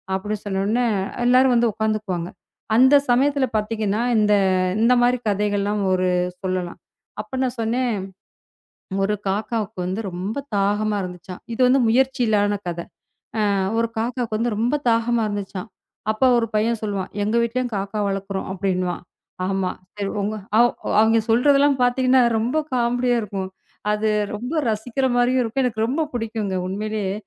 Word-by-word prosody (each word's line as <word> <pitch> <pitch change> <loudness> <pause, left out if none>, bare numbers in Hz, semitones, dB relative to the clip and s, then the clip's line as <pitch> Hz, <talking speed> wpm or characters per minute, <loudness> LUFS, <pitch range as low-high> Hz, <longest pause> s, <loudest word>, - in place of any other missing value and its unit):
அப்படி 210 +2 -2
சொன்னவுடனே, 205 +5 0 0.4
எல்லாரும் 255 +1 +5
வந்து 235 0 +3
உக்காந்துக்குவாங்க. 210 -5 -2 0.5
அந்தச் 275 +4 +5
சமயத்துல 280 +2 +3
பாத்தீங்கன்னா, 215 0 -1 0.2
இந்த 210 -1 +3 0.5
இந்த 240 +2 +5
மாதிரி 245 +1 +3
கதைகள்லாம் 205 0 0
ஒரு 185 0 +1 0.3
சொல்லலாம். 185 -2 -3 0.4
அப்ப 215 +5 -7
நான் 255 -1 -1
சொன்னேன். 240 +1 0 1.1
"ஒரு 210 - 0
காக்காவுக்கு 215 0 -2
வந்து 190 +4 -2
ரொம்ப 185 +4 -4 0.2
தாகமா 205 +1 +1
இருந்துச்சாம்." 180 0 -8
இது 255 - -2
வந்து 260 +1 +4
முயற்சியில்லான 225 -5 +2 0.2
கதை. 170 0 -5 0.7
அ - - +1 0.2
ஒரு 230 - +1
காக்காக்கு 235 -1 -2
வந்து 230 -2 0
ரொம்ப 240 +6 +1
தாகமா 230 +1 +2
இருந்துச்சாம்." 205 0 -5 0.4
அப்ப 215 - -2 0.2
ஒரு 230 - -1
பையன் 225 +1 +1
சொல்லுவான், 200 -3 -3
எங்க 215 +3 0
வீட்டுலயும் 245 0 -2
காக்கா 200 +2 -3
வளர்க்கிறோம்" 195 0 -4
அப்படின்னுவான். 185 -2 -2 0.4
ஆமா. 195 -1 0 0.3
சரி 200 -1 -3
உங்க 210 +2 -2 0.2
அ - - +6 0.4
அவிங்க 225 +1 +4
சொல்றதெல்லாம் 280 +4 +4
பாத்தீங்கன்னா, 255 +1 +3 0.2
ரொம்ப 245 +7 0 0.2
காமெடியா 245 0 +1
இருக்கும். 195 -2 -4 0.4
அது 215 +1 +1 0.3
ரொம்ப 245 +8 -5 0.2
ரசிக்கிற 230 +5 -1
மாரியும் 245 +1 +3
இருக்கும். 240 +3 -1
எனக்கு 220 -3 -1
ரொம்ப 280 +6 -1
புடிக்குங்க. 220 -4 -3
உண்மையிலேயே 205 0 -2
220 Hz, 135 wpm, -22 LUFS, 200-245 Hz, 1.1 s, அ